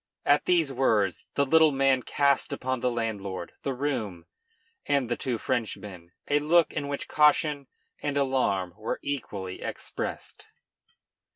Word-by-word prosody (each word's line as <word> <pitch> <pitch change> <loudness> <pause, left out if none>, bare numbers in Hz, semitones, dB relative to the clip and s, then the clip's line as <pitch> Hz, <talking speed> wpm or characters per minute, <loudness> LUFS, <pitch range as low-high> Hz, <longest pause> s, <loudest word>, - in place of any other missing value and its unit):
At 145 +1 +4
these 165 -6 +2
words 110 -8 +1
the 140 - +3
little 160 +2 +5
man 135 -1 +3
cast 140 +1 +1
upon 130 0 -2
the 125 - +1
landlord, 105 -6 -3
the 135 -2 -2
room, 115 -11 -3 0.6
and 140 -4 +1
the 120 - +1
two 125 -2 -2
Frenchmen 100 -7 -4 0.2
a 145 - +3
look 165 +3 +3
in 140 - -3
which 140 0 -4
caution 150 -2 +3 0.3
and 145 -1 -1
alarm 130 -10 +1
were 110 +1 -3
equally 100 -10 -4
expressed. - - -5
130 Hz, 135 wpm, -27 LUFS, 110-145 Hz, 0.6 s, little